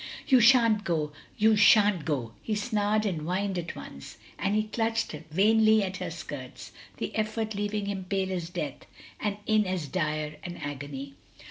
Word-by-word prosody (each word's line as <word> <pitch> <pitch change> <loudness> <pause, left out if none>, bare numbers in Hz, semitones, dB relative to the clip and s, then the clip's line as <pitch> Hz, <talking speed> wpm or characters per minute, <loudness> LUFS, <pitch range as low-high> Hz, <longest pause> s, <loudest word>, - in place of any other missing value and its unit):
"You 260 - +6
shan't 230 -3 +5
go! 155 -5 -1 0.3
You 220 +1 +5
shan't 205 -5 +5
go!" 130 -7 -2
he 215 - -2
snarled 210 0 0
and 175 -7 -1
whined 185 +3 -1
at 170 -1 -6
once. 70 - -10 0.2
And 200 +2 0
he 215 - +2
clutched 225 +1 -1 0.2
vainly 215 +5 +4
at 185 -1 -3
her 180 -2 -4
skirts, 145 -6 -8 0.3
the - - -4
effort 220 0 -1
leaving 205 0 -2
him 195 -2 -4
pale 190 0 -1
as 175 -3 -3
death, - - -5 0.3
and 205 -1 -2
in 215 -2 +3
as 185 -4 -2
dire 155 -2 -2
an 175 -1 -6
agony. 140 -1 -6
195 Hz, 165 wpm, -28 LUFS, 165-215 Hz, 0.3 s, You